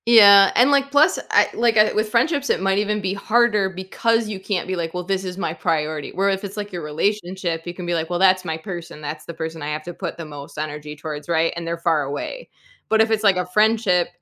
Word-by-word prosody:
Yeah, 200 -4 +8
and, 255 +4 +5
like 280 -1 +2
plus 290 +2 +4
I - - +4
like, 230 -1 +1
I 215 0 +5
with 215 0 0
friendships, 280 +5 +1
it - - +1
might 195 +1 +1
even 210 0 -1
be 190 0 -2
harder 210 -1 +2
because 215 +5 -1
you 205 -2 -5
can't 190 -2 -3
be, 185 - -2
like, 165 -2 -4
"Well 180 - -3
this 190 +1 -2
is 180 -1 -6
my 175 -5 -2
priority," 155 -2 -2
where 195 +1 0
if 195 +1 -2
it's, 200 +1 -7
like, 205 0 -5
your 175 - -4
relationship, 175 +1 -2
you 175 - -4
can 180 - -7
be 175 - -1
like, 165 -1 -2
well, 175 - -1
that's 185 -1 +4
my 160 -3 -3
person, 170 -3 -8
that's 150 +1 -6
the 170 - -7
person 160 0 -6
I 145 - -4
have 150 +1 -4
to 175 - -7
put 170 -1 -6
the 165 - -7
most 145 -1 -10
energy 150 0 -5
towards, 150 +1 -7
right, 165 0 +1
and 170 -1 -6
they're 170 0 -2
far 165 -2 +1
away. 145 - -6 0.4
But 220 0 +4
if 220 0 +2
it's, 220 -1 0
like, 200 -3 +5
a 180 - -1
friendship, 210 -2 +2
185 Hz, 255 wpm, -21 LUFS, 165-210 Hz, 0.4 s, Yeah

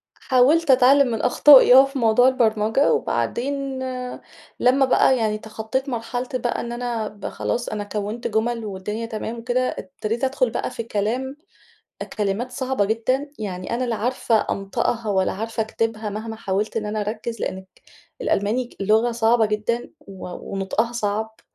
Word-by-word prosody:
حاولت 280 +4 +3
اتعلّم 265 +2 +6
من 225 -3 -2
أخطائي 255 +1 +7
آه، 265 +1 +9
في 275 0 -5
موضوع 230 +2 +4
البرمجة، 225 0 +2
وبعدين 275 +1 -2 0.8
لمّا 265 +2 +4
بقى 260 0 +4
يعني 215 -2 0
تخطّيت 220 +5 -4
مرحلتي 245 +2 -3
بقى 240 -1 -2
إن 235 - -5
أنا 240 -2 -3
ب 205 -1 -11
خلاص 240 - -3
أنا 210 -1 -3
كونت 210 +3 -4
جُمل 230 +1 -1
والدنيا 210 +3 -4
تمام 225 +1 -5
وكده، 245 +2 0
ابتديت 235 -3 -5
ادخل 260 -1 +1
بقى 230 - -3
في - - -5
الكلام 235 +6 -2 0.7
أ - - -3
كلمات 210 +4 -2
صعبة 260 -4 0
جدًا، 255 +7 -1
يعني 185 -1 -4
أنا 250 +2 -1
لا 235 -2 -1
عارفة 235 0 0
أنطقها 215 +3 -2
والّا 190 -2 +1
عارفة 225 +2 -3
اكتبها 220 -1 -2
مهما 220 +2 -5
حاولت 205 +1 -2
إن 215 -2 -1
أنا 215 +1 -2
أركّز، 215 +2 -4
لإنك 190 0 -4 0.5
الألماني 240 - 0
لغة 220 +4 +2
صعبة 230 0 +3
جدًا 215 +3 -2
و 190 -2 -10 0.3
ونُطقها 195 +4 -1
صعب، 220 -1 -3
230 Hz, 155 wpm, -22 LUFS, 215-255 Hz, 0.8 s, آه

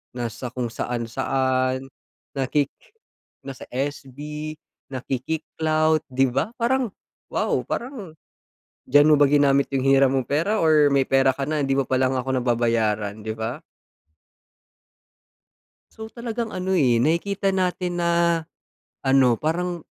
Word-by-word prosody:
nasa 120 +1 -4
kung 125 +1 -3
saan-saan 130 +3 -1 0.5
naki 140 +1 +1 0.8
nasa 135 -2 -8
SB, 145 +3 -5 0.3
nakiki-clout, 155 +4 -1
'di 130 -1 +1
ba? - - 0
Parang 250 +1 +1 0.4
wow, - - 0
parang 235 - -5 0.8
diyan 145 +1 +6
mo 155 - +6
ba 145 - +6
ginamit 140 -1 +3
yung 135 -2 0
hiniram 135 -1 +5
mong 130 -2 0
pera 170 +10 0
or 155 -2 +5
may 140 -1 +3
pera 135 0 +4
ka 140 - -4
na 150 0 -1
hindi 135 -1 +1
mo 135 - +2
pa 130 - -1
lang 130 0 +1
ako 130 +1 -2
nababayaran, 110 -3 0
'di 110 +1 -4
ba? 110 +1 -4 2.3
So, 220 0 -9
talagang 235 -1 -4
ano, 185 0 -2
eh, 130 -9 +3
nakikita 190 +8 +1
natin 180 -1 -1
na 170 -1 +2 0.6
ano 135 -3 +4
parang 175 +1 -2
140 Hz, 125 wpm, -23 LUFS, 130-170 Hz, 2.3 s, diyan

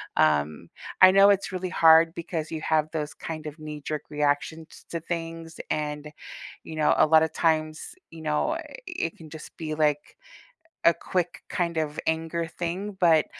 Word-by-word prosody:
um, 75 0 +1 0.3
I 185 0 +10
know 195 +1 +7
it's 200 -1 +2
really 185 0 -3
hard 165 -2 +6
because 165 -2 -4
you 160 -1 -4
have 155 -1 +1
those 150 -2 -3
kind 155 -2 -7
of 150 +1 -9
knee-jerk 150 0 -5
reactions 150 +2 -2
to 170 - -3
things, 165 0 -6
and, 150 0 -3 0.5
you 160 - -8
know, 155 - +4
a - - +6
lotta 160 +1 +5
times, 155 - -1 0.2
you 165 -1 -11
know, 155 - 0
eh, 335 +1 -5 0.2
it 245 - -3
can 160 -2 -12
just 155 0 -11
be, 155 -2 -4
like, 150 -1 0 0.7
a 170 - +7
quick 180 -1 -3
kind 170 -2 -1
of 155 -1 -2
anger 165 +1 -1
thing, 175 +5 -4
but 165 -3 +5
160 Hz, 165 wpm, -26 LUFS, 155-170 Hz, 0.7 s, I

